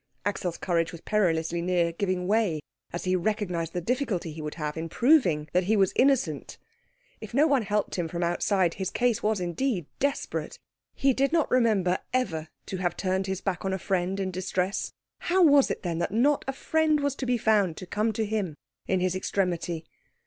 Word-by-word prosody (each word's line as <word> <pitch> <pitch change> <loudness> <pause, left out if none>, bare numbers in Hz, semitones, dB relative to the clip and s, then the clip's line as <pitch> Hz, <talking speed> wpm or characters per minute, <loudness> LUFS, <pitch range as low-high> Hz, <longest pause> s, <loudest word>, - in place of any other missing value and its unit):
Axel's 185 -4 -2
courage 170 -2 0
was 170 - -10
perilously 170 -5 +1
near 175 -1 +1
giving 185 +1 -1
way 205 -5 +2 0.3
as 175 - -4
he 185 0 +1
recognised 180 -4 -1
the 180 - -2
difficulty 215 - -1
he 155 +1 -7
would 150 0 -5
have 150 -2 -3
in 165 0 -4
proving 190 - +3
that 180 0 +2
he 215 +3 +2
was 195 -2 +3
innocent. 270 0 +1 0.6
If 220 +1 -8
no 290 +3 +5
one 280 -5 +3
helped 210 -2 -1
him 170 - 0
from 170 +2 -3
outside, 175 +1 +1
his 190 -1 -3
case 240 +1 +1
was 215 -1 +1
indeed 180 - -1
desperate. 280 0 -2 0.4
He 270 -1 +3
did 275 +3 +1
not 325 -2 +1
remember 210 -7 +3
ever 170 -11 -1 0.2
to 190 - -4
have 175 -2 -1
turned 190 0 -1
his 190 -1 -3
back 190 -3 -2
on 190 0 -1
a - - 0
friend 190 +1 -1
in 190 -1 -1
distress; 185 +2 -2 0.3
how 365 +1 +2
was 285 -4 +6
it, - - -3
then, 170 -2 -2
that 170 - 0
not 270 +7 +2
a 270 - -1
friend 310 +2 +1
was 285 -1 0
to 260 - -3
be 245 0 +2
found 205 -7 +2
to - - -7
come 215 +5 0
to 220 +1 -1
him 205 -7 -2 0.3
in 185 -1 +1
his 185 0 +1
extremity? 175 -3 -1
190 Hz, 200 wpm, -27 LUFS, 175-230 Hz, 0.6 s, was